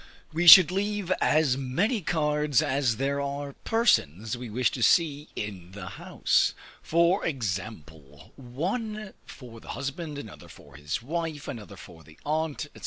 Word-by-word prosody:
We 175 +2 0
should 180 -1 +11
leave 200 -1 -2
as 150 -5 +2
many 180 - -1
cards 150 -3 +1
as 135 -5 0
there 140 +2 -1
are 140 0 -4
persons 110 - +1
we 120 -1 -8
wish 120 +3 0
to 125 - -6
see 150 +2 +2
in 95 -4 -7
the 95 -2 -8
house; 100 - 0 0.3
for 170 +4 +2
example, 90 - -6
one 195 - -4
for 120 -4 -12
the - - -17
husband, 140 +3 -5
another 110 -7 -10
for 70 -2 -16
his 75 +8 -4
wife, 160 +1 -4
another 110 -8 -8
for 80 -2 -14
the 80 +2 -18
aunt, 155 0 -2
&c. - - -12
140 Hz, 150 wpm, -27 LUFS, 110-165 Hz, 0.3 s, should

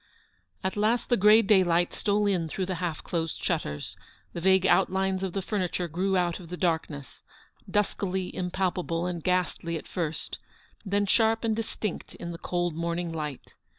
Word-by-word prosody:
At 190 - -1
last 220 +3 +1
the 245 - +5
grey 215 +2 +6
daylight 180 -4 +3
stole 210 0 +1
in 180 -5 +1
through 190 +4 -2
the 185 - -2
half 170 -3 -2
closed 165 -2 -2
shutters, 75 - -2 0.4
the 170 - -4
vague 190 +1 +4
outlines 190 0 +2
of 190 -2 -2
the 195 - -2
furniture 180 -3 -1
grew 185 +4 0
out 175 -2 0
of 170 -3 -11
the 180 - -5
darkness; 160 -5 -2 0.5
duskily 190 -2 0
im 180 -1 -3
palpable 180 -2 -1
and 175 -3 -3
ghastly 180 -2 0
at - - -9
first, 165 -3 -3 0.4
then 205 0 +1
sharp 225 +2 +3
and 225 -1 +1
distinct 215 -3 -4
in 170 - -6
the 165 - -7
cold 175 -2 -1
morning 170 +1 -2
light. 150 -4 -5
180 Hz, 170 wpm, -28 LUFS, 170-195 Hz, 0.5 s, grey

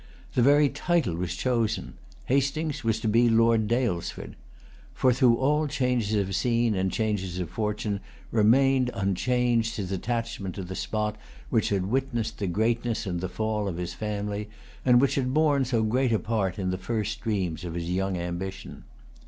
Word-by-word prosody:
The 125 - +2
very 145 +3 +5
title 165 - 0
was 90 +1 -3
chosen. 115 0 -1 0.3
Hastings 140 +3 0
was 110 -1 +1
to - - -1
be 115 +2 +4
Lord 115 -1 +4
Daylesford. 115 -7 -1 0.6
For, 130 -1 +3
through 125 -2 +4
all 150 +5 +1
changes 125 -6 0
of 100 -2 0
scene 120 -1 +2
and 95 -1 0
changes 100 -5 -1
of 90 -3 -4
fortune, 105 -1 -2 0.3
remained 130 +4 +4
unchanged 115 +3 +1
his 95 -3 -4
attachment 115 -1 -3
to 95 - -5
the 90 +1 -6
spot 105 +2 -2 0.3
which 115 -3 +2
had 95 -2 0
witnessed 120 0 -1
the 100 - -1
greatness 115 +4 0
and 90 -3 -3
the 95 - -3
fall 110 +1 -2
of 90 -4 -3
his 90 0 -4
family, 105 +1 -3 0.3
and 125 -1 +5
which 135 +1 +3
had 130 -1 -1
borne 145 -3 +3
so 120 -3 +1
great 125 +3 +1
a 110 - +3
part 110 -4 -1
in 95 -2 -1
the 95 - -3
first 110 +3 -3
dreams 95 -8 -2
of 85 -2 -5
his 85 0 -3
young 95 0 0
ambition. 90 +2 -5
110 Hz, 170 wpm, -27 LUFS, 95-125 Hz, 0.6 s, very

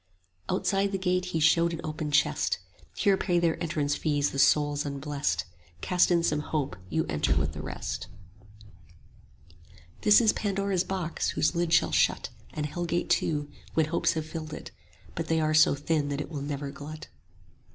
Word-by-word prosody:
Outside 195 0 +1
the 195 - -1
gate 180 -1 0
he 180 -3 -2
showed 165 +2 +4
an 165 - -5
open 155 -1 -4
chest: 145 - +2 0.4
Here 200 -1 +3
pay 175 -2 +1
their 170 -2 +1
entrance 155 -4 0
fees 145 -1 0
the 140 - -3
souls 145 +1 +3
unblest; 140 - -2 0.3
35 85 - -28
Cast 180 -1 +3
in 170 -2 +3
some 150 -2 +1
hope, 150 - -2
you 160 +10 0
enter 75 -2 0
with 70 +1 0
the 75 - -6
rest. - - -5 1.9
This 210 -1 +7
is 225 -3 +4
Pandora's 195 -3 0
box; 185 -3 -2
whose 150 - +1
lid 170 -1 0
shall 170 - +4
shut, - - +2 0.2
And 150 - -3
Hell 175 +4 -3
gate 170 +1 -1
too, 145 -2 0 0.2
when 160 - +4
hopes 170 - +1
have 160 -1 -3
filled 155 -1 -6
it; - - -9 0.4
but 165 -1 -4
They 165 0 +2
are 155 0 +1
so 155 -2 +6
thin 145 0 0
that 140 0 -2
it 150 - -5
will 145 -3 -4
never 140 0 -4
glut. 150 +2 -9
155 Hz, 180 wpm, -28 LUFS, 145-175 Hz, 1.9 s, This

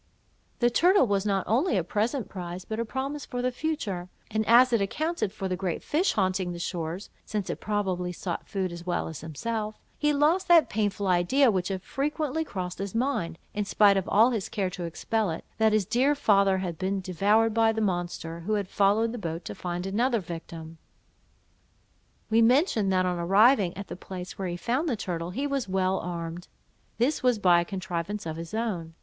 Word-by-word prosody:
The 240 0 +4
turtle 355 +4 +5
was 200 -2 0
not 195 -2 +1
only 245 - +2
a 180 - +1
present 215 - -1
prize, 180 -2 -7
but 220 0 -4
a 230 - 0
promise 275 +4 -4
for 245 0 -4
the 255 - +1
future; 220 - -3 0.2
and 220 0 +1
as 245 +2 +6
it 230 - +3
accounted 310 - -1
for 195 -2 -4
the 185 - -1
great 180 -2 -3
fish 345 +6 +1
haunting 185 -2 0
the - - -6
shores 170 +1 -4
(since 210 -3 -3
it - - -6
probably 190 -4 -1
sought 175 0 -5
food 190 -3 -2
as 170 0 -8
well 175 -1 -1
as 160 -3 -7
himself), 215 +7 -4 0.2
he 295 0 +3
lost 305 +6 +2
that 340 -2 +6
painful 205 -1 -1
idea 190 +9 +4
which 185 -2 -1
had 190 -1 -4
frequently 300 +5 -2
crossed 185 - -5
his 200 +1 -4
mind, 225 -10 -1 0.2
in 210 - -1
spite 200 0 +4
of 195 -1 -1
all 225 +5 +5
his 220 -6 -2
care 190 -3 -1
to 180 -2 -5
expel 210 +5 -1
it, 160 - -5
that 220 0 +4
his 215 -2 +2
dear 250 +8 +2
father 200 -7 +3
had 175 -4 -4
been 195 +1 -1
devoured 205 +5 +2
by 225 0 +4
the 220 - -3
monster, 175 -4 -2
who 195 +6 -2
had 205 -2 0
followed 205 +4 +2
the 240 - -5
boat 165 -2 -5
to - - -5
find 175 0 -4
another 230 +5 +1
victim. 165 -2 -8 1.5
We 225 +1 +5
mentioned, 230 - +3
that 185 -1 +2
on 180 -1 -1
arriving 195 +2 +4
at 200 - -5
the - - -7
place 180 0 -8
where 190 - -2
he 175 0 -3
found 260 - -1
the 245 - +1
turtle, 170 -3 -3
he 265 +10 -3
was 275 -7 -2
well 190 0 +1
armed. 170 0 -5 0.5
This 255 +7 +1
was 250 -3 +3
by 180 -4 +5
a - - -3
contrivance 190 +1 -4
of 160 -1 -4
his 165 +5 -6
own. 180 -8 -3
200 Hz, 205 wpm, -27 LUFS, 180-230 Hz, 1.5 s, as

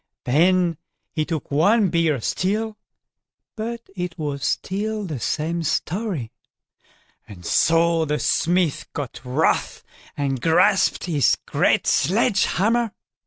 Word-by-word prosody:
Then 170 +4 +3 0.4
he 155 - -1
took 160 -3 -4
one 200 +8 +3
bigger 165 -4 +1
still, 210 - -1 0.8
but 230 +1 -5
it 180 -1 -4
was 145 -4 -4
still 210 +7 -2
the 155 -8 -5
same 160 +8 -2
story; 165 - -2 1.0
and 90 -5 -12
so 165 - +3
the 150 0 -1
smith 170 -3 +1
got 135 -5 -5
wroth, 130 +6 0 0.3
and 135 -3 -1
grasped 180 - +3
his 150 -8 +2
great - - +2
sledge 200 - +2
hammer. 225 +3 +1
170 Hz, 115 wpm, -22 LUFS, 150-195 Hz, 1.0 s, Then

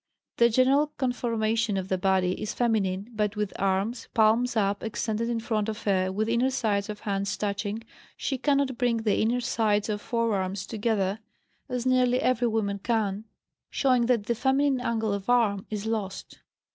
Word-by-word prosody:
The 235 0 +5
general 265 +5 +3
conformation 230 -4 0
of 190 -1 -3
the 190 - 0
body 185 -1 +2
is 215 - -4
feminine. 210 -3 0
But 210 -1 -1
with 210 -1 -2
arms, 195 +5 0
palms 230 +2 +3
up, 200 -1 +1
extended 225 +1 -2
in 235 -1 -1
front 220 -2 -1
of 215 0 -5
her 185 -2 +1
with 215 +3 -1
inner 235 +3 +2
sides 215 -6 -1
of 210 0 -6
hands 200 -1 -2
touching, 205 +1 -3 0.3
she 265 -2 -2
cannot 275 -2 +1
bring 235 -3 +1
the 210 -2 +2
inner 240 +3 +1
sides 215 -4 +1
of 210 -1 -2
forearms 200 -5 -1
together, 210 -2 -1 0.5
as 250 -1 -3
nearly 255 -1 +3
every 250 -1 +2
woman 205 -3 -1
can, 215 -1 -1 0.4
showing 255 -4 +2
that 240 -4 +2
the 235 - +1
feminine 265 +2 +1
angle 225 -3 0
of 200 +2 -4
arm 215 -5 +2
is 210 -1 -4
lost. 215 -4 -4
220 Hz, 170 wpm, -27 LUFS, 200-240 Hz, 0.5 s, The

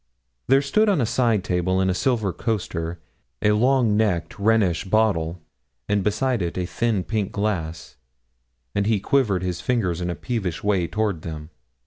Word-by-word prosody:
There 135 +2 +4
stood 215 +10 +2
on 190 -6 +2
a 120 - +2
side 115 -4 +1
table, 95 +1 0
in 95 - +2
its 95 0 0
silver 110 -8 +1
coaster, 90 -7 -3 0.4
a 105 - +4
long 120 0 +3
necked 100 -5 0
Rhenish 100 -5 +2
bottle, 95 -5 +1 0.5
and 105 -1 +1
beside 115 +3 0
it 85 0 -3
a 90 - -1
thin 105 +1 -1
pink 105 -2 -2
glass, 85 -8 -3 0.8
and 100 0 0
he 110 -2 +2
quivered 100 -6 +1
his 90 -1 -3
fingers 90 -5 0
in 90 - -2
a 85 - -2
peevish 100 -9 -3
way 100 -4 +1
toward 105 -5 -1
them. 80 -1 -7
100 Hz, 165 wpm, -23 LUFS, 90-115 Hz, 0.8 s, There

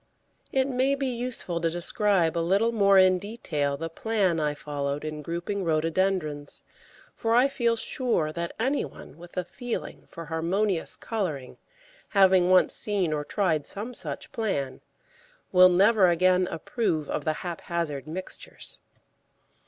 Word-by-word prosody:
] - - -43
It 265 0 +2
may 265 +1 +1
be 275 0 -2
useful 240 -9 -3
to 165 - +2
describe 175 0 +1
a - - +1
little 195 +7 +2
more 200 -3 +4
in 185 -1 +5
detail 155 -9 -3
the 165 - -4
plan 190 0 0
I 150 -1 0
followed 145 0 -4
in 155 -1 -5
grouping 175 +6 -3
Rhododendrons, 160 -2 -1 0.5
for 225 -1 0
I 250 +3 +5
feel 235 -4 +1
sure 225 - 0
that 170 +1 -4
any 265 +5 +1
one 145 - -11
with 175 +1 -13
a 180 - +1
feeling 245 +6 -6
for 165 - -9
harmonious 170 +4 0
colouring, 160 - -4 0.5
having 190 -3 +4
once 185 0 +4
seen 195 -7 0
or 150 -1 -2
tried 160 -4 0
some 215 +5 -3
such - - -4
plan, 145 -12 -2 0.7
will 185 0 +7
never 195 +2 +5
again 180 +1 +3
approve 165 - -2
of 150 - -3
the 155 - 0
haphazard 165 -4 -3
mixtures. 185 +4 -8
180 Hz, 145 wpm, -26 LUFS, 160-210 Hz, 0.7 s, will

